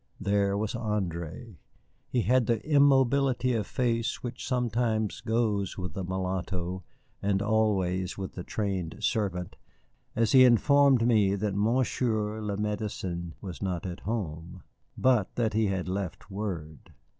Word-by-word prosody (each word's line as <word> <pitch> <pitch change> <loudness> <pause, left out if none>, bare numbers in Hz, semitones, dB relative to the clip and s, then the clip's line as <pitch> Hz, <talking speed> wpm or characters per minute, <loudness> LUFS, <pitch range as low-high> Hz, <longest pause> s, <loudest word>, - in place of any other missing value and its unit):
There 100 0 +1
was 105 0 -2
André. 105 -3 -4 0.5
He 120 -3 +1
had 125 -2 +3
the 115 -2 +2
immobility 135 -3 +4
of 110 -3 -1
face 115 -1 -1
which 120 0 -5
sometimes 115 -4 0
goes 110 -4 0
with 90 -2 -5
the 95 - -4
mulatto, 95 0 -3 0.4
and 100 -1 +1
always 100 -4 +1
with 95 -1 -5
the 90 - -6
trained 95 -6 -3
servant, 95 -6 -1 0.6
as 115 -1 +2
he 130 -1 +8
informed 130 +1 +5
me 105 -5 +3
that 100 0 -1
Monsieur 110 0 0
le 105 -2 -3
Médecin 100 -5 -3
was 90 -3 -7
not 90 -3 -2
at 90 -1 -5
home, 90 -5 -5 0.3
but 125 -7 +2
that 115 -3 0
he 110 0 +2
had 95 -2 -2
left 95 +1 -4
word. 90 -7 -6
105 Hz, 135 wpm, -28 LUFS, 95-115 Hz, 0.6 s, he